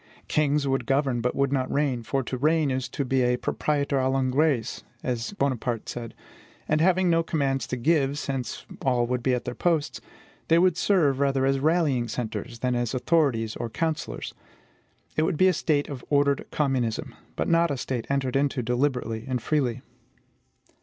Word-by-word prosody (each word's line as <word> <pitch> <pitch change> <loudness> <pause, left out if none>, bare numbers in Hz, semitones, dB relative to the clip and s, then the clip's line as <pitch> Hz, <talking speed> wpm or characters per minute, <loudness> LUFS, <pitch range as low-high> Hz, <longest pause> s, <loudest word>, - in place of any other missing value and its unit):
Kings 150 -1 +1
would 135 -3 0
govern, 135 -3 +1
but 125 +1 -1
would 140 0 +1
not 130 -2 0
reign; 140 -4 0
for 135 +4 -1
to 130 - -4
reign 150 +2 +2
is 130 0 -2
to 140 - -3
be 130 0 +1
a 125 0 +2
proprietor 140 +1 0
a 130 0 +1
l'engrais, 135 -1 +1 0.2
as 120 - -2
Bonaparte 125 - -1
said: 115 -2 -6 0.5
and 155 +1 +2
having 185 +1 +3
no 165 -1 +4
commands 135 -6 -1
to 125 - -3
give, 140 +1 +2
since 135 -5 -4 0.2
all 125 -2 +2
would 125 +1 -1
be 125 +1 +2
at 125 - -4
their 125 - -3
posts, 160 0 0 0.5
they 165 - +5
would 180 -1 +4
serve 160 -9 +2
rather 135 -1 +2
as 135 0 +2
rallying 150 -5 +2
centres 115 0 -4
than 125 -1 +1
as 120 0 -1
authorities 130 -6 +1
or 120 - -4
counsellors. 160 +5 -3 0.8
It - - +2
would 160 0 0
be 185 - +5
a - - +2
state 145 -5 0
of 135 -4 -7
ordered 140 -1 +2
communism, 130 -6 -1 0.2
but - - -1
not 170 0 +3
a 140 - -2
society 125 -2 -3
entered 135 -2 0
into 135 -2 +1
deliberately 125 -2 -1
and 130 -1 -1
freely. 130 -2 -1
135 Hz, 180 wpm, -26 LUFS, 125-150 Hz, 0.8 s, they